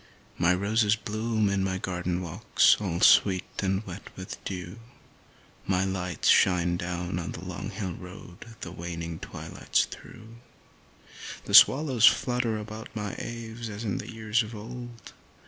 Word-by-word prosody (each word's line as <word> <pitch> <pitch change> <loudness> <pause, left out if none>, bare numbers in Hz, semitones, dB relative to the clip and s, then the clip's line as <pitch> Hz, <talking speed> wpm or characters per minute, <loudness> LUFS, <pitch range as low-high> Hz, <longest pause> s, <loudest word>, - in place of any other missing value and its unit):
My 90 +1 +4
roses 105 +3 +2
bloom 110 0 -1
in 100 -1 +1
my 95 -1 -1
garden 90 -1 -3
walks 85 -3 +3
all 90 -3 -2
sweet 95 -2 +5 0.2
and 95 +2 0
wet 95 +1 -9
with 95 0 -8
the - - -5
dew, 90 +2 -6 0.9
My 95 0 +2
lights 90 -3 -2
shine 90 -2 +4
down 90 +1 -3
on 85 -2 -5
the 85 - -8
long 90 +2 -5
hill 95 -3 -4
road 90 +2 -11
the 85 - -6
waning 85 -1 -6
twilights - - -2
through, 115 +2 -12 1.1
The - - -6
swallows 130 -5 +7
flutter 120 -3 +2
about 110 +1 -8
my 105 -2 -3
eaves 115 0 -6
as 105 +2 -6
in 100 -4 -2
the - - -7
years 110 0 0
of 110 +1 -6
old. 120 0 -9
100 Hz, 150 wpm, -27 LUFS, 90-110 Hz, 1.1 s, swallows